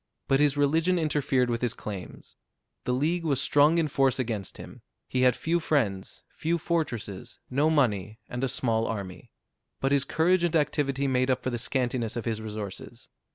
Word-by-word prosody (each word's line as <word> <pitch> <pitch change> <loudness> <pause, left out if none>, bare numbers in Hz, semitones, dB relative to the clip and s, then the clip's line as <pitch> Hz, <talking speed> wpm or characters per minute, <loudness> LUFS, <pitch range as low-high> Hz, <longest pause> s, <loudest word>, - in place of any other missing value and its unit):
But 135 - +3
his 145 -1 +3
religion 160 +5 +2
interfered 145 -6 +1
with 115 - -2
his 120 -3 -1
claims. 100 -4 -8 0.5
The - - 0
League 160 +7 0
was 140 -5 +1
strong 145 +4 +4
in 165 -2 +2
force 135 -2 +2
against 110 -7 -3
him: - - -11 0.3
he 130 - -1
had 125 -1 +5
few 170 +2 0
friends, 115 - -1
few 170 +2 -1
fortresses, 150 - -3
no 145 +4 +3
money, 110 - +1
and 125 +1 -4
a 135 - +1
small 115 -3 0
army. 100 -4 -6 0.5
But 135 - 0
his 140 -2 +3
courage 170 +5 +2
and 170 -1 +1
activity 140 -2 +1
made 130 -1 +1
up 130 -1 +1
for 130 - -1
the 120 - -2
scantiness 125 -2 -1
of 115 - -4
his 110 -2 -2
resources. 105 -3 -7
130 Hz, 180 wpm, -27 LUFS, 115-150 Hz, 0.5 s, had